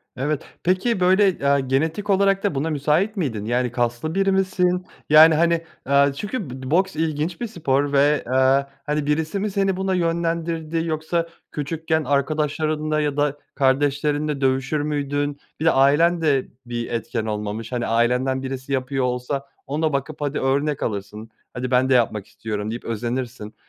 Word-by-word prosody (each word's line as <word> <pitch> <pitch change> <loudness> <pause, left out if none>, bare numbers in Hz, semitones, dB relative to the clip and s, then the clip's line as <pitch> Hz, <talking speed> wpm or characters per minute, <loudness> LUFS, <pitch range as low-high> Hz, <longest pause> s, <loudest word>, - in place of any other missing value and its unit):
Evet, 145 +3 -2 0.2
peki 185 +4 +1
böyle, 190 +2 +5
eee, 140 0 +2
genetik 160 +10 0
olarak 195 0 +3
da 195 -8 0
buna 145 +4 -1
müsait 155 +8 +1
miydin? 115 - -2
Yani, 120 +1 0
kaslı 120 +7 -2
biri 195 0 +2
misin? 180 -1 +1 0.2
Yani, 155 +1 +8
hani, 170 +1 +2 0.2
eee, 140 0 +4
çünkü 205 - -4
bo 130 +2 -7
boks 190 +1 +2
ilginç 160 +3 -2
bir 240 - -1
spor 145 -8 0
ve, 145 +2 +3
eee, 130 +2 +3 0.2
hani, 150 0 -1
birisi 160 +6 0
mi 210 0 -2
seni 195 -1 0
buna 190 0 0
yönlendirdi, 165 -1 -1
yoksa 165 +1 -1 0.2
küçükken 160 +2 -1
arkadaşlarınla 155 +2 0
ya 145 -1 -1
da 145 0 +1 0.2
kardeşlerinle 145 +2 +1
dövüşür 135 +3 +1
müydün? 145 -1 -2 0.2
Bir 160 - -2
de 165 - +6
ailen 165 +6 +4
de 140 -4 +2 0.2
bir 120 -1 -4
etken 115 -1 -2
olmamış. 105 +2 -4
Hani, 120 -1 -1
ailenden 125 +3 +1
birisi 135 +1 -4
yapıyor 130 0 0
olsa 125 +3 -2 0.2
ona 155 +1 0
bakıp 145 +2 -3
hadi 145 0 -1
örnek 140 +2 0
alırsın. 105 +1 -5 0.2
Hadi 125 0 -4
ben 130 +1 +3
de - - +4
yapmak 110 -5 +1
istiyorum 105 0 -5
deyip 120 - -6
özenirsin. 120 -1 -4
145 Hz, 160 wpm, -22 LUFS, 130-165 Hz, 0.2 s, Yani